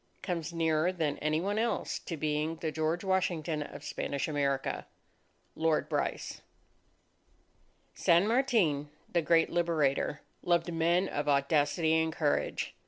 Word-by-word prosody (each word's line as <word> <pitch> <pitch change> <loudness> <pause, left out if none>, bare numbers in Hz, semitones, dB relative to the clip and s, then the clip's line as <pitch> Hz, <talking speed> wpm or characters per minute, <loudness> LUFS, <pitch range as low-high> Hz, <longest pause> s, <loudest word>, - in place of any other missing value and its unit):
comes 170 -4 -3
nearer 165 0 +1
than 160 -5 -2
any 155 +1 +1
one 200 +4 -1
else 235 +1 -1
to 165 - -6
being 150 +1 -1
the 160 -1 -3
George 160 +3 -1
Washington 175 -5 0
of 145 - -8
Spanish 140 -1 -3
America._ 140 -3 -1 0.7
LORD 160 -1 +1
BRYCE - - -2 1.5
San 170 +4 +3
Martin, 220 - +2 0.2
the 170 - +1
great 165 +1 +3
Liberator, 155 -4 +1 0.2
loved 175 -1 +1
men 170 +3 +2
of 145 -3 -2
audacity 145 +3 +2
and 160 0 0
courage. 155 -2 -1
160 Hz, 125 wpm, -31 LUFS, 150-175 Hz, 1.5 s, San